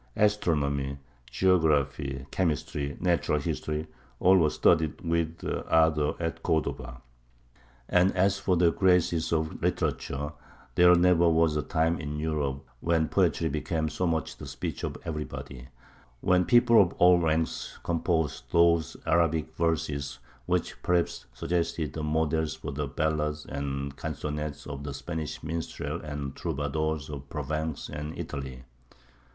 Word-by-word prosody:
Astronomy, 70 Hz, -10 st, +1 dB, 0.3 s
geography, 70 Hz, -4 st, +1 dB
chemistry, 75 Hz, -5 st, -1 dB
natural 85 Hz, -3 st, +1 dB
history 75 Hz, +2 st, -3 dB, 0.3 s
all 95 Hz, +1 st, +6 dB
were 80 Hz, -5 st, +4 dB
studied 80 Hz, 0 st, +2 dB
with 85 Hz, -1 st, -1 dB, 0.3 s
ardour 80 Hz, -2 st, +3 dB
at 80 Hz, -1 st, -3 dB
Cordova; 60 Hz, -5 st, -2 dB, 0.8 s
and 90 Hz, +2 st, +4 dB
as 95 Hz, +1 st, +3 dB
for 95 Hz, -2 st, +1 dB
the 85 Hz, -1 st, +4 dB
graces 90 Hz, -3 st, +2 dB
of 80 Hz, -1 st, -1 dB
literature, 75 Hz, +2 st, -1 dB, 0.4 s
there 90 Hz, +3 st, +7 dB
never 85 Hz, -1 st, +5 dB
was 80 Hz, -1 st, +3 dB
a 75 Hz, -, +1 dB
time 80 Hz, +4 st, 0 dB
in 75 Hz, -1 st, -4 dB
Europe 75 Hz, -3 st, -2 dB
when 80 Hz, 0 st, +1 dB
poetry 80 Hz, -, +2 dB
became 80 Hz, +1 st, -1 dB
so 85 Hz, +5 st, -1 dB
much 80 Hz, -1 st, -1 dB
the -, -, -8 dB
speech -, -, -5 dB
of -, -, -3 dB
everybody, 70 Hz, -5 st, -6 dB, 0.5 s
when 90 Hz, 0 st, +3 dB
people 120 Hz, -2 st, +6 dB
of 90 Hz, -3 st, +1 dB
all 90 Hz, 0 st, +6 dB
ranks 80 Hz, -1 st, -1 dB
composed 80 Hz, -6 st, 0 dB
those 85 Hz, -1 st, +3 dB
Arabic 80 Hz, -1 st, +1 dB
verses 75 Hz, -4 st, -1 dB, 0.3 s
which -, -, -1 dB
perhaps 90 Hz, -1 st, 0 dB
suggested 85 Hz, +2 st, -2 dB
models 80 Hz, 0 st, 0 dB
for 80 Hz, -2 st, -6 dB
the 70 Hz, +1 st, -3 dB
ballads 75 Hz, +1 st, -1 dB
and 70 Hz, -1 st, -4 dB
canzonettes 75 Hz, -1 st, -4 dB
of 70 Hz, -1 st, -6 dB
the 70 Hz, -1 st, -5 dB
Spanish 80 Hz, 0 st, -5 dB
minstrels 80 Hz, -1 st, -4 dB
and 75 Hz, -2 st, -4 dB
the -, -, -15 dB
troubadours 75 Hz, +1 st, -2 dB
of 70 Hz, -2 st, -8 dB
Provence 80 Hz, -1 st, -3 dB
and 75 Hz, +1 st, -6 dB
Italy. 65 Hz, -2 st, -6 dB
80 Hz, 130 wpm, -28 LUFS, 75-85 Hz, 0.8 s, there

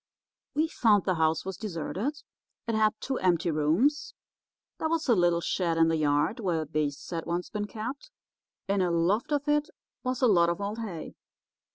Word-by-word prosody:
"We 310 Hz, +2 st, +2 dB
found 215 Hz, -10 st, +3 dB
the 185 Hz, -, +2 dB
house 160 Hz, -1 st, +1 dB
was 190 Hz, -2 st, -5 dB
deserted. 215 Hz, -, -4 dB, 0.4 s
It 230 Hz, -, -2 dB
had 215 Hz, -1 st, +3 dB
two 265 Hz, -1 st, -3 dB
empty 175 Hz, -2 st, +2 dB
rooms. 165 Hz, -, +1 dB, 0.6 s
There 315 Hz, -, 0 dB
was 325 Hz, -1 st, 0 dB
a 245 Hz, -, +5 dB
little 175 Hz, -3 st, +3 dB
shed 170 Hz, -2 st, 0 dB
in 165 Hz, 0 st, +5 dB
the 165 Hz, -, +2 dB
yard 150 Hz, -, +1 dB
where 170 Hz, -7 st, -1 dB
beasts 150 Hz, 0 st, -3 dB
had 165 Hz, -2 st, -4 dB
once 175 Hz, +1 st, -2 dB
been 210 Hz, 0 st, -3 dB
kept. 245 Hz, -, -6 dB, 0.6 s
In 200 Hz, 0 st, +1 dB
a 180 Hz, -, +2 dB
loft 185 Hz, -, +1 dB
of 290 Hz, 0 st, 0 dB
it 295 Hz, +2 st, +2 dB, 0.3 s
was 255 Hz, 0 st, -2 dB
a -, -, +7 dB
lot 170 Hz, -5 st, +4 dB
of 170 Hz, -, -2 dB
old 205 Hz, +2 st, -3 dB
hay. 190 Hz, -8 st, -6 dB
190 Hz, 185 wpm, -28 LUFS, 165-240 Hz, 0.6 s, a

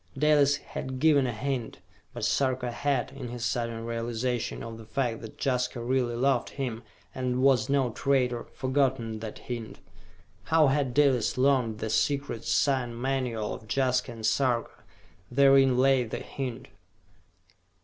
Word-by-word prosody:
Dalis 145 Hz, -1 st, +4 dB
had 130 Hz, -2 st, -6 dB
given 145 Hz, -3 st, +4 dB
a -, -, -1 dB
hint, 125 Hz, 0 st, -3 dB, 0.3 s
but 120 Hz, -3 st, -4 dB
Sarka 130 Hz, -2 st, 0 dB
had, 135 Hz, +1 st, -1 dB
in 135 Hz, -2 st, -7 dB
his 120 Hz, 0 st, -5 dB
sudden 115 Hz, -1 st, -2 dB
realization 115 Hz, +1 st, -2 dB
of 115 Hz, -1 st, -7 dB
the 110 Hz, -, -11 dB
fact 120 Hz, -4 st, -2 dB
that 110 Hz, -, -10 dB
Jaska 125 Hz, -2 st, -1 dB
really 120 Hz, 0 st, 0 dB
loved 135 Hz, +3 st, +1 dB
him, 125 Hz, -5 st, -4 dB, 0.3 s
and 130 Hz, 0 st, -1 dB
was 130 Hz, -4 st, +4 dB
no 135 Hz, -3 st, +2 dB
traitor, 125 Hz, -1 st, 0 dB
forgotten 130 Hz, -4 st, 0 dB
that 110 Hz, -1 st, -7 dB
hint. 115 Hz, -5 st, -6 dB, 0.7 s
How 160 Hz, -3 st, +4 dB
had 135 Hz, -3 st, 0 dB
Dalis 135 Hz, -7 st, +3 dB
learned 130 Hz, -4 st, +2 dB
the 110 Hz, 0 st, -3 dB
secret 140 Hz, -3 st, 0 dB
sign 125 Hz, -4 st, +1 dB
manual 125 Hz, -4 st, -1 dB
of 110 Hz, -, -10 dB
Jaska 125 Hz, +1 st, +1 dB
and 115 Hz, -1 st, -6 dB
Sarka? 120 Hz, 0 st, +1 dB, 0.6 s
Therein 135 Hz, -1 st, +5 dB
lay 135 Hz, 0 st, +4 dB
the 110 Hz, -, -5 dB
hint. 130 Hz, -1 st, -6 dB
125 Hz, 145 wpm, -28 LUFS, 115-135 Hz, 0.7 s, Therein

